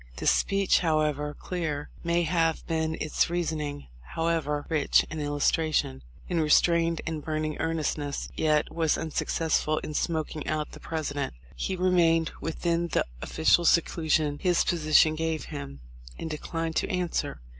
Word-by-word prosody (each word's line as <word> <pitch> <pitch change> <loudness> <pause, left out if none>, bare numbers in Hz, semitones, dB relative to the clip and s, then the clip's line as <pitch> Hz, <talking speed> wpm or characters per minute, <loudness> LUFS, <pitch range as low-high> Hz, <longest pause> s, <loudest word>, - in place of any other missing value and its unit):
This - - +3
speech, 195 -1 +2
however 150 -3 0
clear 155 -5 -4
may 170 0 +1
have 165 -1 +1
been 160 -1 -1
its 155 - +1
reasoning, 155 -4 -2 0.3
however 160 -3 0
rich 155 -3 +3
in 155 - -4
illustration, 145 - 0 0.3
in 175 - 0
restrained 165 +1 +3
and 160 -2 -4
burning 155 -1 -2
earnestness, 150 -3 -2
yet 155 -1 +1
was 160 -2 +1
unsuccessful 160 -1 0
in 150 - -5
"smoking 155 -1 -2
out" 155 -1 -2
the - - -11
President. 145 - -3 0.2
He 190 - -2
remained 170 -3 +3
within 170 +1 -1
the - - 0 0.2
of - - -6
ficial 160 +2 +4
seclusion 155 -3 +2
his 180 -2 +2
position 155 -2 +4
gave 160 0 -2
him, 70 -1 -7 0.4
and 160 - -5
declined 165 +1 -3
to - - 0
answer. 180 -2 -2
160 Hz, 140 wpm, -27 LUFS, 150-165 Hz, 0.4 s, ficial